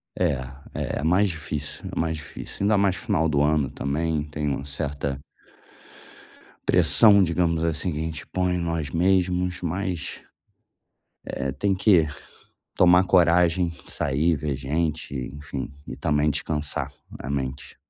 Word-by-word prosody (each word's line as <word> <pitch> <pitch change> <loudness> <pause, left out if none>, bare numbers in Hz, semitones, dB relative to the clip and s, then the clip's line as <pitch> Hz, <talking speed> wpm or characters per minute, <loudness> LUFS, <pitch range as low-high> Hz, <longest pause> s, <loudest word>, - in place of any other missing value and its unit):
É, - - +1 0.4
é. - - -3
É - - -4
mais 90 +6 +3
difícil, 75 -3 -5
é - - -2
mais 80 -1 0
difícil. 80 +5 -8
Ainda 105 +1 +3
mais 100 -2 +2
final 80 - 0
do 75 -2 +1
ano, 75 -2 +2
também, 75 +3 -1
tem 75 0 -4
uma 70 -1 -2
certa 70 -1 -3 1.5
pressão, 100 -3 +7
digamos 85 -1 +1
assim, 85 +1 0
que - - -5
a - - -2
gente 80 -1 -5
põe 90 -1 0
em - - 0
nós 85 -4 -2
mesmos. 90 0 +1
Mas, 90 0 -3 1.0
eh, 70 0 -3
tem 95 +9 0
que 90 -5 +4 0.7
tomar 90 +1 +5
coragem, 90 -1 +3 0.2
sair, 75 +4 0
ver 75 -1 -2
gente, 75 +3 -2 0.2
enfim, 70 -1 -6
e - - -6
também 75 0 +1
descansar 75 0 -2 0.3
a 70 - -6
mente. 65 -1 -4
80 Hz, 140 wpm, -24 LUFS, 75-90 Hz, 1.5 s, pressão